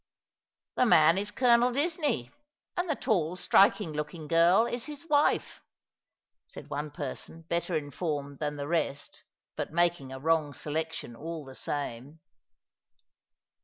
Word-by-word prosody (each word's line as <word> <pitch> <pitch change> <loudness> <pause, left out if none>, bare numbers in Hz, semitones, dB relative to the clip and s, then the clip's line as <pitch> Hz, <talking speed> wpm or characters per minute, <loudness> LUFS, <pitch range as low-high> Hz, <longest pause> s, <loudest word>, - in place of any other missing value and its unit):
" - - -64
The 250 - +4
man 165 -2 +6
is 205 +1 -2
Colonel 240 +1 +4
Disney, 290 - 0 0.4
and 355 -2 -1
the 305 - +1
tall, 180 -9 0
striking 195 -2 +4
looking 150 +1 -5
girl 170 +7 +5
is 240 0 -3
his 295 0 -8
wife," 295 -2 +1 0.9
said - - -10
one 145 +2 -3
person 150 +2 -7
better 170 +1 -1
informed 145 -1 -4
than 150 -1 -2
tha 145 0 -5
rest, 150 -3 -2 0.3
but - - -4
making 170 -5 +1
a 130 - -6
wrong 155 -1 +1
selection 155 -5 -4
all 160 +3 -6
the 135 - -10
same. 140 +2 -5
165 Hz, 135 wpm, -29 LUFS, 145-205 Hz, 0.9 s, man